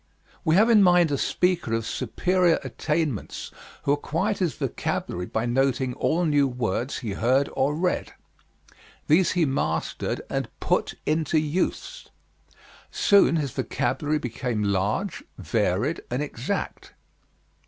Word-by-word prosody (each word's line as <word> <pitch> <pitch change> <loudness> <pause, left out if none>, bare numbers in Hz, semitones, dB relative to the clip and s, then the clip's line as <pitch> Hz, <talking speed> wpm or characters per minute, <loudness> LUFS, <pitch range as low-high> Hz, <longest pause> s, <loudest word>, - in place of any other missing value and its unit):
We 160 - +3
have 220 +5 +5
in 215 -3 +7
mind 175 -4 +5
a - - +2
speaker 180 -10 +1
of 115 -1 -2
superior 180 +3 +1
attainments 150 - -3 0.3
who 140 - +1
acquired 165 +8 -1
his 180 -5 0
vocabulary 90 +1 -3
by 110 +1 -2
noting 130 +1 +1
all 170 +7 0
new 145 -3 +3
words 125 0 -2
he 115 -5 -4
heard 130 +7 +1
or 145 +3 +1
read. 180 +3 -1 0.9
These 170 +3 +3
he 175 -3 +2
mastered 135 -1 -2
and - - -3
put - - 0
into 155 0 +1
use. 170 - -2 0.8
Soon 200 -4 +4
his 145 -5 -1
vocabulary 130 +4 -1
became 120 -4 -3
large, 100 - -1
varied, 110 - 0
and 125 +4 -1
exact. 125 -4 -4
145 Hz, 125 wpm, -25 LUFS, 120-170 Hz, 0.9 s, in